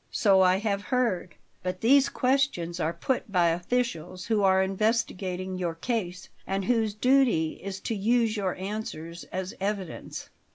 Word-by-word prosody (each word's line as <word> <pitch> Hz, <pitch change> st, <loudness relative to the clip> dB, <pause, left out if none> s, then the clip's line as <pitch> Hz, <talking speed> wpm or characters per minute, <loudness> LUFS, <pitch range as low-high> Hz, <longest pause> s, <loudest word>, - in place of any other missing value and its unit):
So 195 Hz, -3 st, +4 dB
I 185 Hz, 0 st, +5 dB
have 200 Hz, -1 st, -1 dB
heard; 205 Hz, -, -1 dB, 0.3 s
but 180 Hz, 0 st, -4 dB
these 270 Hz, +4 st, +5 dB
questions 250 Hz, -11 st, 0 dB
are 160 Hz, 0 st, 0 dB
put 245 Hz, +3 st, -2 dB
by 175 Hz, -3 st, +4 dB
officials 180 Hz, -1 st, -2 dB
who 220 Hz, -3 st, +1 dB
are 190 Hz, -1 st, +4 dB
investigating 190 Hz, -3 st, -1 dB
your 170 Hz, -2 st, -2 dB
case 185 Hz, -1 st, -3 dB, 0.2 s
and 195 Hz, 0 st, -1 dB
whose 220 Hz, -3 st, +1 dB
duty 250 Hz, -10 st, +2 dB
is 195 Hz, 0 st, -5 dB
to -, -, -2 dB
use 225 Hz, +2 st, +2 dB
your 195 Hz, -3 st, -1 dB
answers 180 Hz, -4 st, -6 dB
as 185 Hz, +1 st, -5 dB
evidence." 195 Hz, -3 st, -4 dB
195 Hz, 150 wpm, -27 LUFS, 180-225 Hz, 0.3 s, I